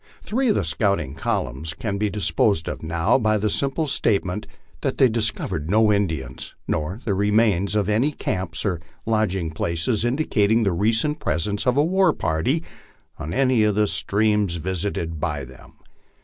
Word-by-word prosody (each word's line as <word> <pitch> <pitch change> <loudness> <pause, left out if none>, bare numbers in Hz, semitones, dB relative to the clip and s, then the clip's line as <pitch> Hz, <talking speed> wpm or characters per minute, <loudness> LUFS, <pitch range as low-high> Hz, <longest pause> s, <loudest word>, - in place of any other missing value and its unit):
Three 260 +4 0
of 210 - +3
the - - +1
scouting 80 -3 0
columns 75 +3 -3
can 100 +2 -3
be 105 0 +1
disposed 100 -3 +1
of - - -4
now 85 +9 +1
by 110 -2 +2
the 105 0 0
simple 140 +3 0
state 110 -8 +1
ment 90 +4 -4 0.3
that - - -1
they 130 - +6
discovered 105 -9 -1
no 110 +1 +4
Indians, 80 -11 -3
nor 80 +7 -2
the 105 - +1
remains 105 -1 +2
of 105 -2 +1
any 115 +8 +2
camps 95 - -2
or 90 -5 0 0.3
lodging 95 -7 0
places 85 +8 -1
indicating 115 -4 +2
the 100 - +2
recent 115 - +2
presence 100 - -1
of 125 +2 +2
a 145 - +4
war 185 -1 +3
party 80 - 0 0.6
on 80 0 -5
any 130 -1 +2
of 105 -1 +2
the 105 0 +3
streams 105 -2 +1
vis 90 +2 -2
ited 80 -5 -3
by 75 -3 -2
them. 65 0 -15
105 Hz, 170 wpm, -23 LUFS, 85-115 Hz, 0.6 s, they